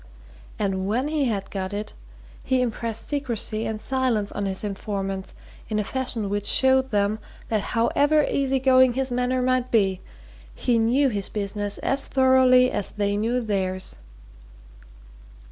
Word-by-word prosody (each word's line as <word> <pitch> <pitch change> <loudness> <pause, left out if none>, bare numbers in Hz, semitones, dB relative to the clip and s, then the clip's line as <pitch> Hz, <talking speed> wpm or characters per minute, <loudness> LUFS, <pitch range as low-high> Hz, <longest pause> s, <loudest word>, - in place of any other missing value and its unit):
And 190 -2 -1
when 245 +7 0
he 305 -3 0
had 200 -5 -2
got 190 0 -4
it, 210 +1 -5 0.5
he 260 -1 +1
impressed 230 -1 -3
secrecy 235 -6 -2
and 220 -1 -3
silence 250 -5 -1
on 205 -1 -3
his 190 +1 -2
informants 195 -1 -4 0.3
in 215 - -1
a 210 - +1
fashion 245 -2 -2
which 205 +1 -2
showed 265 0 +3
them 205 0 0 0.3
that 220 -2 +1 0.2
however 290 +6 +3
easy 270 -1 +1
going 260 -1 +5
his 265 +1 -1
manner 250 +1 0
might 255 0 +1
be, 195 -5 +2 0.5
he 240 -2 +1
knew 255 +5 +3
his 200 -4 -3
business 205 0 -3
as 275 +1 -1
thoroughly 260 -1 +5
as 205 - -2
they 205 -1 -1
knew 230 +4 0
theirs. 190 -4 -2
225 Hz, 145 wpm, -24 LUFS, 205-260 Hz, 0.5 s, going